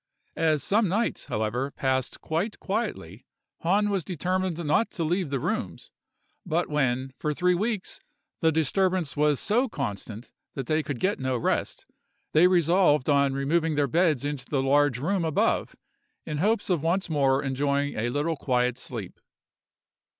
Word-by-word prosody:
As 155 -3 +2
some 210 +1 +2
nights, 210 +7 -1
however, 120 +2 -2
passed 130 -2 -2
quite 175 +7 -2
quietly, 190 - -4 0.3
Hahn 205 +5 +2
was 195 -4 0
determined 185 +1 -2
not 150 +10 +2
to 170 - -2
leave 175 0 0
the 135 -1 -1
rooms; - - -3 0.5
but 170 +3 0
when, 130 -2 0
for 150 -1 -1
three 180 +3 +2
weeks, 210 +2 -2 0.4
the 160 -1 +3
disturbance 170 +1 +1
was 150 -1 +2
so 240 +5 +1
constant 110 - -5 0.2
that 135 - -3
they 155 +3 +1
could 145 -5 -5
get 200 +2 0
no 130 -1 -1
rest, 115 - -1 0.5
they 165 +4 +6
resolved 170 -5 +3
on 140 -1 +3
removing 155 +3 +1
their 145 -1 +2
beds 155 -1 +1
into 145 -3 -4
the 135 -3 0
large 145 -1 +3
room 175 +7 0
above, 160 -3 0 0.5
in 150 -1 -3
hopes 205 +2 +1
of 170 -5 +1
once 170 +4 0
more 140 -3 +2
enjoying 140 +1 0
a 115 +2 -1
little 150 +5 -1
quiet 125 -3 0
sleep. 110 -8 -7
150 Hz, 155 wpm, -26 LUFS, 135-180 Hz, 0.5 s, they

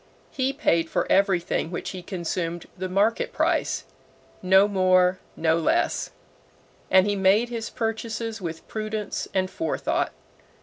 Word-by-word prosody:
He 265 0 0
paid 170 - +1
for - - 0
everything 190 -4 +2
which 175 - -4
he 185 - -7
consumed 175 -2 -3
the 185 0 -4
market 220 - +1
price - - 0 0.6
no 190 +2 +5
more, 185 -2 +3 0.2
no 160 0 +2
less 160 - +1 0.8
and 190 0 +6
he 205 0 0
made 200 +5 +3
his 230 -2 -4
purchases 225 -1 -3
with 165 -2 -6
prudence 215 -1 -4
and 185 -1 +1
forethought. 325 - -1
190 Hz, 130 wpm, -25 LUFS, 180-220 Hz, 0.8 s, and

